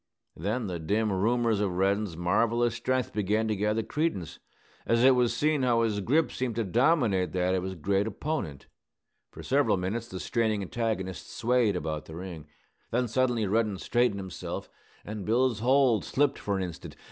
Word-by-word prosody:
Then 110 +8 -2
the 90 -3 -4
dim 105 +6 0
rumors 115 +2 +1
of 95 -4 -1
Reddin's 100 -2 0
marvellous 115 +7 +2
strength 130 +2 -1
began 105 +2 0
to 110 - 0
gather 105 +2 0
credence, 150 - -2 0.4
as 115 +1 +2
it 130 0 +7
was 125 -2 +2
seen 150 -1 +2
how 120 -2 +3
his 105 -3 0
grip 145 - +2
seemed 125 -3 -3
to 115 - 0
dominate 115 - +2
that 90 0 +1
of 95 - +1
his 95 0 -4
great 100 +5 0
opponent. 110 - -4 0.6
For - - -11
several 135 -6 +2
minutes 105 +6 -3
the 95 -5 -7
straining 110 -2 0
antagonists 95 -4 -3
swayed 120 -4 +2
about 80 -3 -3
the 80 - -10
ring. 85 -4 -8 0.4
Then 125 +1 0
suddenly 120 -1 +1
Reddin 105 0 +1
straightened 120 0 +1
himself, 95 -2 -6 0.3
and 105 -1 -5
Bill's 115 +2 +1
hold 125 -2 +3
slipped 145 0 +1
for 100 -1 -1
an 95 - -1
instant. 90 -3 -7
110 Hz, 170 wpm, -28 LUFS, 95-120 Hz, 0.6 s, it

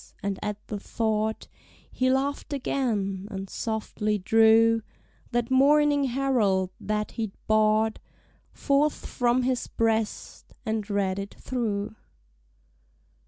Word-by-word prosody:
And 200 -1 -2
at 210 -1 -3
the 210 - -4
thought 220 0 -1 0.4
He 255 0 +1
laugh'd 275 +2 -1
again, 205 -8 -1
and 195 -2 -5
softly 215 -1 -2
drew 225 +3 +5 0.5
That 240 0 -1
Morning 285 +1 +4
Herald 235 -8 +1
that 210 0 -2
he'd 220 -4 -4
bought 215 0 +3 0.5
Forth 285 +1 +1
from 245 0 +1
his 255 0 -1
breast, 225 -1 -2
and 220 -2 -2
read 200 -1 0
it 200 0 -6
through. 220 -5 -3
220 Hz, 110 wpm, -26 LUFS, 210-255 Hz, 0.5 s, drew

